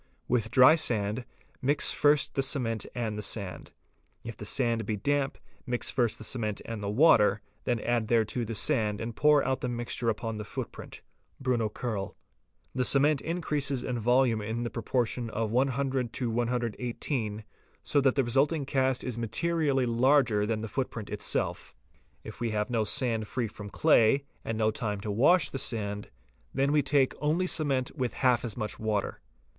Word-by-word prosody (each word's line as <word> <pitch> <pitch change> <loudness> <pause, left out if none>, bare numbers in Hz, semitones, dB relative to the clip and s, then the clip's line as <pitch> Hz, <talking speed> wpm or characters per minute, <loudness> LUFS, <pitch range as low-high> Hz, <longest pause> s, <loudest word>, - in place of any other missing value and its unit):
With 115 -3 0
dry 130 +5 +7
sand, 115 -6 0 0.4
mix 145 +2 +3
first 145 -1 +2
the 135 - +1
cement 120 -6 -1
and 110 -3 -2
the - - -3
sand: 100 -2 -3 0.5
if 115 -1 -7
the 105 - -9
sand 115 0 0
be 110 +1 -2
damp, 140 +5 0 0.3
mix 120 0 0
first 120 -4 +1
the - - -9
cement 110 -3 -2
and 115 -3 -5
the 100 - -2
water, 110 -3 +5 0.3
then 120 -2 0
add 120 -2 0
thereto 115 +1 +1
the 115 0 -4
sand 105 -3 +1
and 115 0 -5
pour 150 -1 +4
out 130 0 -1
the 125 - -2
mixture 120 0 -2
upon 115 0 -3
the 105 - -5
footprint 105 - -8 0.4
(Bruno 125 -4 0
Kerl). 105 -4 -4 0.6
The 130 - 0
cement 140 +2 +3
increases 150 -6 -1
in 125 -2 -2
volume 120 -1 +3
in 110 +3 -3
the 120 - -3
proportion 120 0 -1
of 110 -1 -2
100 130 0 0
to 120 -3 -1
118, 120 -1 -2 0.4
so 145 - +2
that 135 -1 +3
the 135 - +3
resulting 140 +5 +1
cast 130 -2 +1
is 120 -2 -4
materially 140 +3 0
larger 120 -3 +3
than 110 -1 -1
the 110 - -4
footprint 110 -2 -4
itself. - - -3 0.5
If - - -10
we 120 -1 -1
have 105 +1 -2
no 115 -3 +1
sand 110 -1 0
free 125 +1 -2
from 105 -1 -8
clay, 140 0 +4 0.2
and 115 - -3
no 110 0 +2
time 105 -2 -3
to 105 - -3
wash 150 - +4
the 135 - -3
sand, 105 -5 -3 0.5
then 135 +2 +2
we 150 0 +4
take 135 -1 +2
only 155 +5 +1
cement 140 -7 -1
with 125 -2 -2
half 125 -3 +2
as 115 -2 -5
much 110 -3 -4
water. 110 -2 -2
120 Hz, 175 wpm, -29 LUFS, 110-135 Hz, 0.6 s, dry